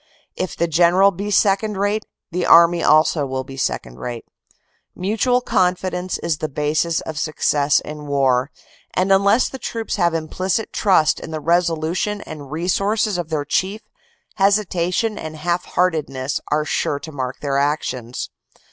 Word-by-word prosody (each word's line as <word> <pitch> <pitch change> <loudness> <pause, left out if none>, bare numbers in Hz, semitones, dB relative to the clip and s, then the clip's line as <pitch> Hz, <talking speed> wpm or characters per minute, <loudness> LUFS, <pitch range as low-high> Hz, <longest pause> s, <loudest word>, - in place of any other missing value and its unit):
If 185 -2 -4
the 170 - +1
general 175 +4 +4
be 200 +3 -5
second 205 0 +2
rate 205 +2 -1 0.2
the 175 +1 -1
army 170 0 +6
also 155 -1 +4
will 130 0 -3
be 135 +1 -10
second 60 - -3
rate. 120 -2 -6 0.7
Mutual 225 +6 +1
confidence 180 -3 0
is 165 -3 -2
the 155 - -3
basis 150 +3 0
of 155 -1 -5
success 150 -2 +1
in 150 -1 -8
war, 135 -2 +2 0.5
and 185 +1 +1
unless 200 +5 +4
the 265 - -8
troops 225 -3 -4
have 170 -3 +2
implicit 185 +6 -2
trust 185 -7 +3
in - - -8
the 160 -1 -4
resolution 170 +5 0
and 145 -3 -9
resources 195 +4 0
of 170 -2 -4
their 150 -2 -2
chief, 190 +8 -1 0.6
hesitation 195 +1 +1
and 155 0 -6
half 170 +3 -1
heartedness 150 -7 -1
are 150 0 0
sure 145 - -1
to 160 - -9
mark 130 -2 -4
their 140 -1 0
actions. 125 - -2
170 Hz, 150 wpm, -20 LUFS, 150-195 Hz, 0.7 s, army